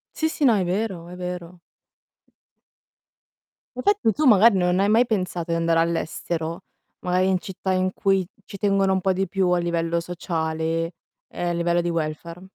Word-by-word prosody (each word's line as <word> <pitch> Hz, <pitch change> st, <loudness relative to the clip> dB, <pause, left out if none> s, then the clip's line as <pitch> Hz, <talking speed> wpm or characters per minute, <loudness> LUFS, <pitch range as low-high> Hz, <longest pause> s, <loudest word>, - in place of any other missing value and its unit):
Sì, 315 Hz, 0 st, 0 dB
sì. 305 Hz, -, -4 dB
No, 235 Hz, -4 st, +5 dB
è 190 Hz, -, +1 dB
vero, 180 Hz, -2 st, -2 dB
è 180 Hz, -, -9 dB
vero. 180 Hz, -1 st, -6 dB, 2.2 s
Infatti 400 Hz, -, +2 dB
tu 305 Hz, +5 st, -1 dB
magari 220 Hz, -3 st, +6 dB
non 180 Hz, +1 st, +2 dB
hai 200 Hz, +1 st, +3 dB
mai 230 Hz, +3 st, +4 dB
pensato 180 Hz, -6 st, -2 dB
di 165 Hz, -, +1 dB
andare 165 Hz, 0 st, +2 dB
all'estero, 165 Hz, +1 st, -2 dB, 0.4 s
magari 180 Hz, +1 st, +1 dB
in 185 Hz, -1 st, +2 dB
città 190 Hz, 0 st, -3 dB
in 185 Hz, 0 st, +1 dB
cui 195 Hz, -3 st, +1 dB, 0.2 s
ci 200 Hz, -, -9 dB
tengono 195 Hz, -1 st, +2 dB
un 190 Hz, -, 0 dB
po' 190 Hz, 0 st, +2 dB
di 190 Hz, 0 st, -1 dB
più 185 Hz, 0 st, 0 dB
a 180 Hz, 0 st, +3 dB
livello 170 Hz, -1 st, 0 dB
sociale 165 Hz, -1 st, -2 dB, 0.3 s
e -, -, -7 dB
a 175 Hz, -, 0 dB
livello 170 Hz, 0 st, +1 dB
di 175 Hz, -, -2 dB
welfare? 165 Hz, +1 st, -4 dB
180 Hz, 170 wpm, -23 LUFS, 170-195 Hz, 2.2 s, magari